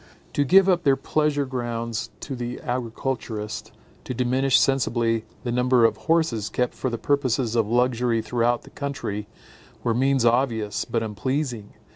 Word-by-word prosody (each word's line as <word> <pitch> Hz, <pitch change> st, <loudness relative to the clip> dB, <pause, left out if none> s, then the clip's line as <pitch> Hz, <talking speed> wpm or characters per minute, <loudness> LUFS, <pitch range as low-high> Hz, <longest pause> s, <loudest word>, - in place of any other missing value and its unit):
To 145 Hz, -, +2 dB
give 190 Hz, +7 st, +6 dB
up 180 Hz, -2 st, +3 dB
their 140 Hz, -5 st, +4 dB
pleasure 145 Hz, +1 st, 0 dB
grounds 120 Hz, -3 st, -3 dB
to 135 Hz, -, -5 dB
the 120 Hz, 0 st, -5 dB
agriculturist, 115 Hz, -3 st, -4 dB, 0.3 s
to 125 Hz, -, -5 dB
diminish 130 Hz, +2 st, +3 dB
sensibly 115 Hz, -4 st, +1 dB, 0.2 s
the 120 Hz, -, -2 dB
number 125 Hz, -1 st, +4 dB
of 110 Hz, -1 st, +3 dB
horses 160 Hz, -11 st, +1 dB
kept 125 Hz, 0 st, -1 dB
for 130 Hz, -, -2 dB
the 120 Hz, -, -3 dB
purposes 130 Hz, -2 st, 0 dB
of 115 Hz, -3 st, +2 dB
luxury 120 Hz, -1 st, +1 dB
throughout 120 Hz, +2 st, +1 dB
the -, -, -15 dB
country, 120 Hz, -8 st, -4 dB, 0.6 s
were 115 Hz, -, +1 dB
means 135 Hz, +1 st, +2 dB
obvious, 115 Hz, -4 st, +1 dB
but 115 Hz, -1 st, -1 dB
unpleasing. 120 Hz, +1 st, -3 dB
120 Hz, 150 wpm, -24 LUFS, 115-135 Hz, 0.6 s, give